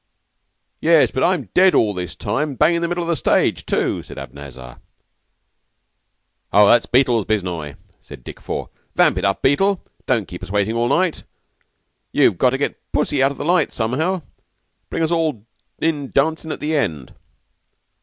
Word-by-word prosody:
"Yes, 165 -1 +4
but 130 - -1
I'm 170 - +1
dead 185 0 +5
all 105 -2 +3
this 90 -2 -5
time. 150 0 -2
Bung 155 +6 +3
in 170 - 0
the 170 - 0
middle 175 0 -2
of - - -5
the 170 - +1
stage, - - +1
too," - - 0
said - - -12
Abanazar. 65 -3 -10 1.7
"Oh, 105 0 +6
that's 120 - +4
Beetle's 120 -4 +2
biznai," 90 -9 -2 0.3
said 60 - -13
Dick - - -10
Four. - - -5 0.2
"Vamp - - +3
it - - -2
up, 100 -1 0
Beetle. 195 +8 +2 0.2
Don't 115 -6 +1
keep 90 - -9
us - - -8
waiting 105 +2 0
all 120 +1 0
night. 175 +3 +1 0.9
You've 85 - +3
got 130 - +5
to 135 - -1
get 140 - -3
Pussy 145 -2 0
out 135 - +4
of 140 - -9
the - - -5
light 175 -1 +2
somehow, 130 +11 -1
and 180 -4 -5 0.7
bring 165 - -2
us 160 - 0
all 155 -10 -1 0.3
in 150 -4 -1
dancin' 160 +3 0
at - - -6
the 155 +1 -1
end." 80 - -2
135 Hz, 175 wpm, -20 LUFS, 105-160 Hz, 1.7 s, Oh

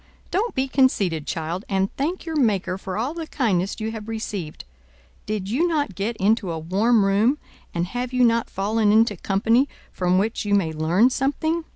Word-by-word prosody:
Don't 435 +6 0
be 265 +1 +1
conceited, 200 - +1
child, 165 +4 -3
and 195 -1 0
thank 330 +7 -2
your 325 -1 -4
Maker 210 -10 +1
for 190 0 -5
all 250 +7 -1
the 330 -1 -6
kindness 200 - 0
you 220 0 -2
have 220 -1 -7
received. 210 -7 -5 0.6
Did 210 -3 -2
you 270 - +1
not 295 - 0
get 205 +5 -3
into 205 -2 +1
a 165 - -3
warm 200 +7 +2
room, 210 +8 +3 0.3
and 170 0 -1
have 245 +6 -4
you 255 -1 +2
not 230 0 +2
fallen 210 +2 +1
into 220 0 +4
company 225 +9 +2 0.2
from 180 0 +1
which 215 +4 0
you 205 -1 +2
may 165 -5 +1
learn 170 +11 +3
something? 315 +5 -1
215 Hz, 185 wpm, -23 LUFS, 190-255 Hz, 0.6 s, into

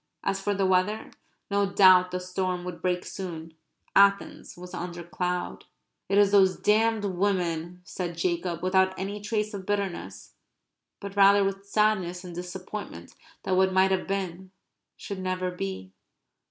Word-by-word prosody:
(As 195 0 -1
for 205 +1 -1
the 195 0 +1
weather, 185 +3 +1 0.4
no 200 0 +2
doubt 185 -2 +6
the 180 0 -3
storm 180 0 -3
would 180 -1 -7
break 180 -1 -1
soon; 165 -4 -7 0.4
Athens 200 -2 +2
was 180 0 -10
under 175 0 -5
cloud.) 180 +1 -3 0.4
"It 200 - +2
is 205 -1 +5
those 190 -2 +5
damned 220 0 +2
women," 180 -3 -1
said 175 -1 -5
Jacob, 170 0 -2
without 190 0 +2
any 200 +2 -4
trace 210 0 -2
of 195 -2 -7
bitterness, 200 -3 -4 0.7
but 200 -1 -8
rather 200 0 +6
with 195 0 -3
sadness 200 -4 +1
and 180 -1 -8
disappointment 180 - -7 0.3
that 185 - 0
what 190 0 +3
might 190 0 +4
have 190 -1 0
been 190 -1 -4 0.5
should 200 -2 -6
never 185 0 -2
be. 95 - -6
185 Hz, 150 wpm, -27 LUFS, 180-200 Hz, 0.7 s, doubt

